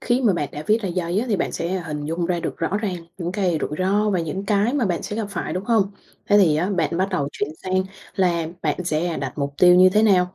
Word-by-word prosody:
Khi 245 +1 +1
mà 215 -5 +4
bạn 145 -5 -2
đã 150 - -6
viết 220 +1 +2
ra 195 - -2
giấy 175 +1 -1
á, 240 - -1
thì 210 - +2
bạn - - -2
sẽ 170 - -2 0.2
hình 150 -1 -4
dung 165 +3 -2
ra 175 -1 -1
được - - -4
rõ 165 +4 -1
ràng 205 -4 -2 0.2
những 175 0 -3
cái 185 -5 0
rủi - - -2
ro 205 +3 +2
và 185 -3 +1
những 190 +5 -4
cái 210 +4 +2
mà 275 -5 +1
bạn 175 -2 -1
sẽ 205 - -5
gặp 220 -2 -2
phải, 185 - -4
đúng 185 +2 -3
hông? 225 -3 +3 0.5
Thế 205 - +6
thì 160 -7 +4
á, 180 +6 0
bạn 170 -3 0
bắt 190 +1 +1
đầu 155 -7 -1
chuyển - - -2
sang 185 0 0 0.3
là 175 -5 +1 0.2
bạn 180 - -1
sẽ, 160 0 0
à, 170 - -2
đặt 135 +1 -5
mục 140 0 -2
tiêu 180 -1 +7
như 185 +1 +7
thế 210 +3 +3
nào. 185 -4 +3
185 Hz, 285 wpm, -22 LUFS, 170-205 Hz, 0.5 s, tiêu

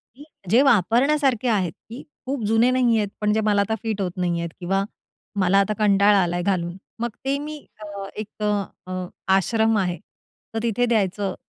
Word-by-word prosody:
की 285 - -13 0.3
जे 235 +6 +5
वापरण्यासारखे 255 - +3
आहेत, 195 -7 +1 0.2
की 235 +4 -8 0.2
खूप 265 -3 -3
जुने 225 +3 +3
नाही 245 -3 +3
आहेत, 205 -2 0
पण 210 0 +2
जे 220 - +1
मला 205 -1 +2
आता 220 +2 0
फिट 220 -3 -2
होत 180 -2 -1
नाही 175 -1 0
आहेत 170 0 -3
किंवा 195 +2 0 0.6
मला 190 +1 +4
आता 200 +2 +1
कंटाळा 200 0 +4
आलाय 175 0 -1
घालून. 175 -2 -1 0.2
मग 235 - -1 0.2
ते 275 +1 +1
मी 300 +1 -6 0.2
अ, 210 - -8 0.3
एक 215 0 -7
अ, 210 - +2 0.4
अ 185 0 -4 0.3
आश्रम 220 +3 +2
आहे, 180 -3 0 0.6
तर 225 - -1
तिथे 235 +1 +1
द्यायचं 200 -4 0
210 Hz, 185 wpm, -23 LUFS, 190-235 Hz, 0.6 s, जे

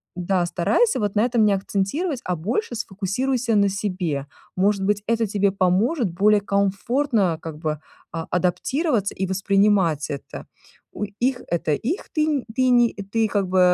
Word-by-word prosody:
да, 180 0 0
старайся 185 - +1
вот 205 -1 -1
на 210 +3 +3
этом 240 -2 +2
не 210 - +4
акцентировать, 210 - -1
а 180 - -1
больше 230 - -2
сфокусируйся 230 +4 -1
на 200 -1 +4
себе. 180 -8 -2 0.3
Может 195 +1 +2
быть, 205 0 0
это 230 0 +1
тебе 200 -1 +1
поможет 195 - +1
более 205 +4 +4
комфортно 200 - +1
как 160 -2 -7
бы 155 -2 -2 0.3
а 165 -1 -4
адаптироваться 205 - 0
и 190 - -2
воспринимать 195 -5 +2
это. 140 - -7 0.5
У - - -4 0.2
их 250 +1 0
это 165 -3 0
их 285 - -2
ты 305 -1 +2
не 290 -4 0
ты 255 -1 +3
не 240 -2 +4
ты 210 +3 -1
как 200 -2 0
бы, 185 0 +2
200 Hz, 160 wpm, -23 LUFS, 185-235 Hz, 0.5 s, не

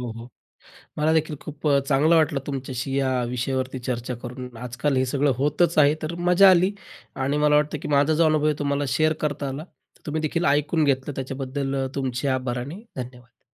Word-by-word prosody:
हो, 125 -1 -4
हो. 115 +2 -10 0.7
मलादेखील 155 0 +1
खूप 150 0 -5
अ, 140 -1 +4
चांगलं 150 +4 +4
वाटलं 155 -3 +2
तुमच्याशी 135 -1 -4
या 135 -1 +1
विषयावरती 130 +2 -2
चर्चा 125 0 -3
करून 125 -1 -8
आजकाल 125 +4 -2
हे 130 - +2
सगळं 140 +2 +1
होतच 150 +5 +1
आहे, 145 0 +6
तर 155 +2 -4
मजा 180 +3 +5
आली 185 +1 +4 0.4
आणि 135 +2 -1
मला 150 0 +3
वाटतं 150 +1 +1
की - - -5
माझा 145 +1 +3
जो 165 +2 +3
अनुभव 155 -1 +2
आहे 155 -1 +2
तुम्हाला 140 0 0
शेअर 155 +5 +2
करता 145 -1 -2
आला. 135 +3 -5
तर 180 - -27
तुम्ही 155 +1 -2
देखील 170 +3 -1
ऐकून 150 +3 +2
घेतलं 140 0 0
त्याच्याबद्दल 135 +1 -3
तुमचे 130 -1 -2
आभार 125 -1 -3
आणि 145 - -6
धन्यवाद. 125 -1 -9
140 Hz, 185 wpm, -24 LUFS, 130-155 Hz, 0.7 s, आहे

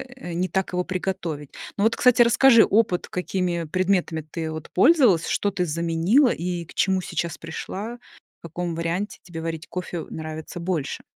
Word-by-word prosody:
э, 175 -10 -7
не 180 +2 0
так 190 0 -1
его 180 0 +1
приготовить. 175 -6 -4 0.3
Ну 200 - +1
вот, 225 - +3
кстати, 245 -1 +5
расскажи 235 0 +7
опыт: 200 -4 +2
какими 180 -2 -2
предметами 180 -1 0
ты 160 +1 -5
вот 155 -1 -7
пользовалась, 235 - +5
что 205 - +1
ты 180 -2 -1
заменила 170 - +2
и 175 -2 -3
к - - -15
чему 190 -1 +2
сейчас 170 -1 -3
пришла, 200 +8 -6 0.4
в 170 - -9
каком 170 +1 -4
варианте 170 +5 -3
тебе 165 -3 -7
варить 165 -1 -5
кофе 175 -1 -5
нравится 160 +2 -6
больше? 170 -5 -3
180 Hz, 165 wpm, -24 LUFS, 165-195 Hz, 0.4 s, расскажи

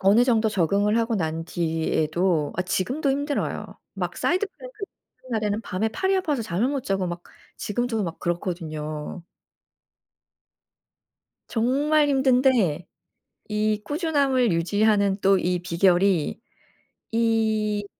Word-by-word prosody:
어느 205 +5 +5
정도 225 -3 +2
적응을 205 +3 +2
하고 230 0 0
난 165 -4 -2
뒤에도 160 0 0
아 185 - +1
지금도 255 - -1
힘들어요. 285 +1 -2 0.3
막 - - -3
사이드 370 +3 +1
플랭크를 435 0 -10 0.4
하는 - - -13
날에는 210 0 -1
밤에 200 +5 -1
팔이 380 - 0
아파서 300 -9 0
잠을 215 +3 0
못 275 -2 -2
자고 195 -2 0
막 175 0 -5 0.3
지금도 225 +1 -2
막 165 -2 -5
그렇거든요. 165 -2 -4 2.3
정말 290 +6 +2
힘든데 255 - +3 0.6
이 215 0 0
꾸준함을 280 - +1
유지하는 200 +3 +2
또 195 0 +4
이 180 0 0
비결이 175 +1 +2 0.7
이 220 -2 +1
210 Hz, 255 characters per minute, -24 LUFS, 180-255 Hz, 2.3 s, 어느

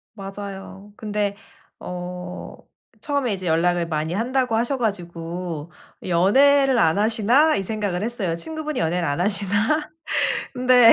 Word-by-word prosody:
맞아요. 195 0 -8
근데 210 -2 -1 0.4
어 180 0 -6 0.5
처음에 280 -6 0
이제 185 -1 -5
연락을 170 +1 +2
많이 155 +1 -2
한다고 250 +1 +1
하셔 240 +4 +1
가지고 175 - -4 0.3
'연애를 265 +9 +4
안 160 +1 +3
하시나?' 230 +8 +4
이 195 - 0
생각을 200 -3 -2
했어요. 210 -8 -1
친구분이 310 - -4
연애를 170 +1 0
안 145 +2 -1
하시나? 205 - +1 0.6
근데 250 -2 +7
200 Hz, 280 characters per minute, -23 LUFS, 180-240 Hz, 0.6 s, 근데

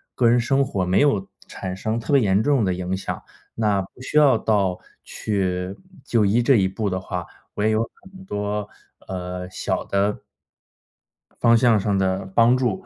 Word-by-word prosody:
个 120 - +3
人 120 +1 +4
生 135 +3 +2
活， 95 -8 -2
没 90 +2 +2
有 105 -10 +2 0.2
产 95 -1 -6
生 110 +4 -2
特 110 - -5
别 140 - +6
严 100 -1 +3
重 140 -5 +2
的 95 - +1
影 90 +1 -3
响， 95 - -5 0.3
那 105 -3 +1
不 95 +6 -12
需 130 - -2
要 140 -6 +6
到 100 -5 0 0.2
去 95 -2 -2 0.3
就 115 -5 +2
医 105 +5 +3
这 130 +3 +4
一 95 -4 +3
步 100 +2 -2
的 95 0 -2
话， 90 -1 -5 0.3
我 105 - -2
也 110 - +3
有 110 +1 +2 0.2
很 190 0 -14
多， 105 - -3 0.4
呃， 90 -1 -5
小 90 - -2
的 100 +1 0 1.2
方 115 0 +6
向 115 -2 +4
上 100 0 0
的 95 0 0
帮 120 +2 +5
助。 120 -7 -1
105 Hz, 195 characters per minute, -23 LUFS, 95-115 Hz, 1.2 s, 别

